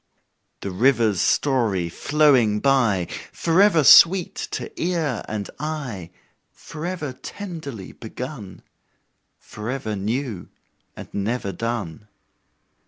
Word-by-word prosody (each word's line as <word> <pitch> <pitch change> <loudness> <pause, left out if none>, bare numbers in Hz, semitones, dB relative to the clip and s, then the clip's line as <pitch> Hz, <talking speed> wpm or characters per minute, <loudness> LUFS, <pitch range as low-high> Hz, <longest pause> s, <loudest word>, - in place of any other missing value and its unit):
The 100 - -4
river's 115 -1 +2
story 115 -11 +1
flowing 130 - +3
by, 115 -9 +2 0.2
Forever 170 -1 +3
sweet 170 +7 +7 0.2
to - - -5
ear 165 -8 -1
and 105 -2 -4
eye, 135 - -5 0.4
Forever 155 -3 -6
tenderly 145 - -8
begun 115 -3 -8 0.7
Forever 110 0 -5
new 110 0 -3 0.5
and - - -8
never 100 +1 -2
done. 105 -2 -4
125 Hz, 90 wpm, -23 LUFS, 105-150 Hz, 0.7 s, sweet